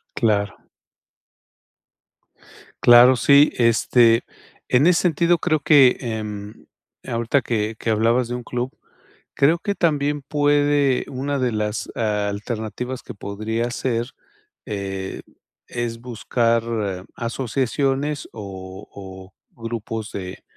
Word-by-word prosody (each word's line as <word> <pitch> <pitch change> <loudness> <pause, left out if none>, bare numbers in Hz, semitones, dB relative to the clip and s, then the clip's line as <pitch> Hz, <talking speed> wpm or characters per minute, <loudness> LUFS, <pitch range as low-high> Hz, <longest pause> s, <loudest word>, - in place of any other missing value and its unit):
Claro. 100 -3 0 2.2
Claro, 120 +2 +8
sí, 140 +4 +5
este, 115 0 +4 0.4
en 125 +5 +3
ese 180 -1 +4
sentido, 170 0 +2
creo 155 -3 +1
que 140 -4 +6
em, 105 -3 -6 0.4
ahorita 115 +4 0
que 110 -2 -2
que - - -3
hablabas 115 +3 +2
de 120 - -4
un 125 - -6
club. 125 +2 -3 0.6
Creo 155 +5 +4
que 200 +4 -2
también 145 -4 0
puede 145 -1 +2
Una 140 +2 -3
de 125 -2 0
las 105 0 -2
alternativas 110 +3 -3
que - - -9
podría 110 +4 -3
ser, 120 -1 -2 0.6
eh, 95 -2 -5 0.5
es 120 -1 -4
buscar 115 -1 0 0.5
asociaciones, 135 +4 -1
o 95 -3 -9
o 95 -1 -11 0.3
grupos 115 -1 -5
de, 95 -2 -7
120 Hz, 105 wpm, -22 LUFS, 105-135 Hz, 2.2 s, Claro